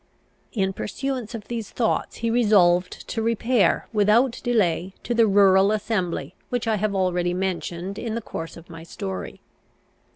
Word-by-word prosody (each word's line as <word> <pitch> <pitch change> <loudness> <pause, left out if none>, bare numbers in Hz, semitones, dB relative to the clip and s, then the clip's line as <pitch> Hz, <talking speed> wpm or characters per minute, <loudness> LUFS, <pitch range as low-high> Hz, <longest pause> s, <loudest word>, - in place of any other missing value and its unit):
In 195 -3 0
pursuance 250 +2 -4
of 215 -2 -8
these 230 -3 -4
thoughts 230 -3 -1
he 230 - +1
resolved 190 -6 +3
to 225 - -2
repair, 230 0 +2
without 225 +4 +3
delay, 190 -7 +1
to 240 - -1
the 230 -1 +4
rural 195 0 +5
assembly 210 -5 -2 0.2
which 245 -2 -2
I 220 -1 +2
have 205 0 -1
already 180 -2 0
mentioned 185 +1 -3
in 225 -2 -3
the - - -1
course 165 -4 -6
of 170 - -13
my 165 -1 -10
story. 95 - -6
205 Hz, 155 wpm, -24 LUFS, 180-230 Hz, 0.2 s, rural